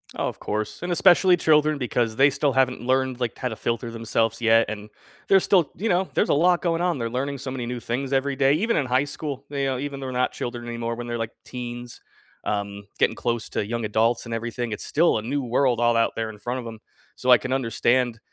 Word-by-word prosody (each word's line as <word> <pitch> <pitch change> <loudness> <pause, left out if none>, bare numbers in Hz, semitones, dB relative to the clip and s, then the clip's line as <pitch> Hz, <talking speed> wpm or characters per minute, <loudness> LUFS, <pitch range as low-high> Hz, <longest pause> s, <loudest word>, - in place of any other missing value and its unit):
Oh, - - -1
of - - -10
course, 105 0 -3
and 175 - -2
especially 180 +1 +5
children 155 -2 +3
because 120 -3 -1
they 135 +4 +5
still 140 0 0
haven't 130 -1 +2
learned, 130 0 0
like, 120 -2 -2
how 125 - -2
to 110 - -6
filter 115 0 -2
themselves 115 0 -1
yet, 115 0 +5
and 105 0 -6 0.4
there's 195 -1 +5
still, 175 -8 +3
you 225 +3 -2
know, 180 +1 +2
there's - - +1
a - - +4
lot 175 +4 +3
going 170 -1 0
on; 175 -3 +1
they're 115 -2 -2
learning 135 +3 -3
so 130 0 -5
many 125 -2 -4
new 120 0 -4
things 130 +4 -3
every 135 0 0
day, 135 0 +4
even 225 +9 +1
in 140 - +1
high 130 +2 +2
school, 145 -1 -6
you 140 -1 -2
know, 135 -1 -1
even 140 +1 -5
they're 130 -1 -5
not 125 0 +1
children 120 -1 -5
anymore 115 0 -3
when 120 0 -6
they're, 120 0 -3
like, 115 -1 -3
teens, 120 -1 -7 0.5
um, 100 -1 -3 0.2
getting - - +3
close 120 -2 -2
to 105 - -2
young 115 +1 -3
adults 110 +3 +1
and 115 - -5
everything, 120 +1 -3
it's 105 - -5
still 165 -2 +3
a - - -2
new 135 +5 -2
world 125 0 +1
all 120 -1 +3
out 115 - +2
there 115 -1 -2
in 110 - -10
front 125 +3 -3
of - - -11
'em. 110 -1 -8 0.4
So, 130 - -3
I 125 - +9
can 130 +4 -6
understand 120 -1 +1
125 Hz, 240 wpm, -24 LUFS, 115-140 Hz, 0.5 s, I